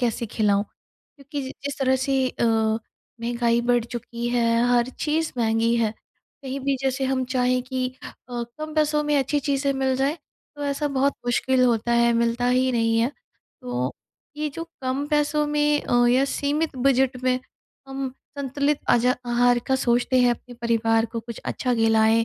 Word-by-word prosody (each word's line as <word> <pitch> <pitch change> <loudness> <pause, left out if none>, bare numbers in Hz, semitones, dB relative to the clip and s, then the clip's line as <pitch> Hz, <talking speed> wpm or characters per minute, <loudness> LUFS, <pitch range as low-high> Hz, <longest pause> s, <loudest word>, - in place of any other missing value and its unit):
कैसे 235 -1 -1
खिलाऊँ? 205 -2 +1 0.5
क्योंकि 280 +1 -6
जि 265 - -6
जिस 285 0 -4
तरह 265 -1 +2
से 265 0 +1
अ, 245 - -2 0.8
महँगाई 235 0 +1
बढ़ 240 -2 +3
चुकी 235 0 -5
है, 235 -1 +2
हर 240 0 +3
चीज़ 315 +1 0
महँगी 225 0 +2
है। 225 -2 +1 0.5
कहीं 270 0 -4
भी 275 0 0
जैसे 270 0 0
हम 260 -1 0
चाहें 250 0 +1
कि 255 0 -2 0.2
अ, - - -8 0.5
कम 310 0 -6
पैसों 300 -1 +2
में 295 0 +1
अच्छी 280 +2 0
चीज़ें 280 0 0
मिल 265 -1 0
जाए 275 +4 0 0.4
तो 290 - -4
ऐसा 285 +1 -1
बहुत 280 +1 +2
मुश्किल 255 +1 +2
होता 235 -1 +1
है, 235 0 +4
मिलता 235 +1 +1
ही 255 +1 +3
नहीं 230 -1 +2
है। 235 +3 +2 0.5
तो 125 +1 -2 0.4
ये 300 0 -1
जो 330 +4 -6 0.2
कम 260 +2 -1
पैसों 300 0 +1
में 295 0 +2
अ, 245 0 +3
या 255 +3 +4
सीमित 290 +2 -1
बजट 260 0 +2
में 255 0 +2 0.5
हम 270 -1 -4 0.3
संतुलित 280 +2 0
अजा 250 +2 +4
आहार 245 0 +3
का 265 - +2
सोचते 245 0 +2
हैं, 245 -1 +5
अपने 245 +1 -5
परिवार 225 -1 +2
को 230 +1 -5
कुछ 230 0 -8
अच्छा 250 -2 -1
खिलाएँ 225 0 +3
255 Hz, 175 wpm, -24 LUFS, 235-275 Hz, 0.8 s, हैं